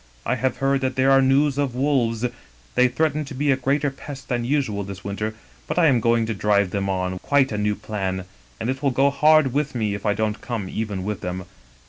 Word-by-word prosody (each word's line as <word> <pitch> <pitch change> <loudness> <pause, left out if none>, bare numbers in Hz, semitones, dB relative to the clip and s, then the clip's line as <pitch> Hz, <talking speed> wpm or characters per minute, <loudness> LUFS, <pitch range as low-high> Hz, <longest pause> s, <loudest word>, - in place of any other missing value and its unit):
I - - +1
have 130 0 -1
heard 135 +1 +1
that 130 0 -1
there 130 +1 +3
are 135 0 +6
news 135 +1 +3
of 135 -4 -1
wolves 125 -4 +1 0.2
— - - -30
they 125 0 +5
threaten 155 +3 0
to 140 - -8
be 145 +2 +1
a - - +4
greater 140 +2 0
pest 140 0 -10
than 120 -2 0
usual 120 -6 0
this 95 -1 -8
winter, 105 +2 -3 0.3
but - - -3
I 175 - +5
am 130 -6 +4
going 115 0 +2
to 115 - -2
drive 100 -2 +1
them 100 0 -1
on 90 -1 -2
quite 135 +1 +2
a 105 - -2
new 105 0 +1
plan, 95 -4 -3 0.3
and 115 - -3
it 130 +1 -5
will 140 - +2
go 135 +2 +3
hard 150 -2 +4
with 145 -1 -1
me 110 -3 0
if 100 - -5
I 105 -1 +1
don't 110 -1 -1
come 115 -6 -4
even 105 -2 -3
with 105 0 -3
them. 90 0 -4
120 Hz, 235 wpm, -23 LUFS, 105-135 Hz, 0.3 s, are